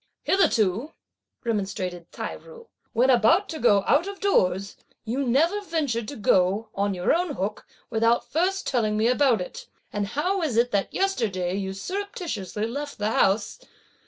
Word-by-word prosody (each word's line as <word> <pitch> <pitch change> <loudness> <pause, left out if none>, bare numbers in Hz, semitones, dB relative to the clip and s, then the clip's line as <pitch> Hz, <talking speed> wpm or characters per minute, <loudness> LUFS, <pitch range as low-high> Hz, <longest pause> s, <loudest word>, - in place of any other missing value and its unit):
"Hitherto," 235 - +2 0.5
remonstrated 190 -6 -3
Tai - - -5
ju, 475 -1 -14 0.3
"when 255 +3 +3
about 260 - +4
to 315 - -5
go 205 -6 +4
out 320 +6 +3
of 400 -1 -6
doors, 200 - +1 0.3
you 250 +5 -1
never 330 +12 +2
ventured 290 - -2
to 285 - -6
go, 200 +1 +2
on 200 0 0
your 180 0 +2
own 340 -3 0
hook, 195 +3 -4 0.2
without 230 +1 +2
first 375 +5 0
telling 215 -5 0
me 220 +2 +3
about 250 -3 +3
it, 180 - -8 0.3
and 205 -1 -1
how 360 - -1
is 285 -9 -1
it 240 +1 +3
that 200 -1 0
yesterday 215 - -1
you 195 -1 -3
surreptitiously 260 - -4
left 285 +5 -5
the 210 +1 -1
house? 205 - +1
235 Hz, 160 wpm, -25 LUFS, 200-325 Hz, 0.5 s, about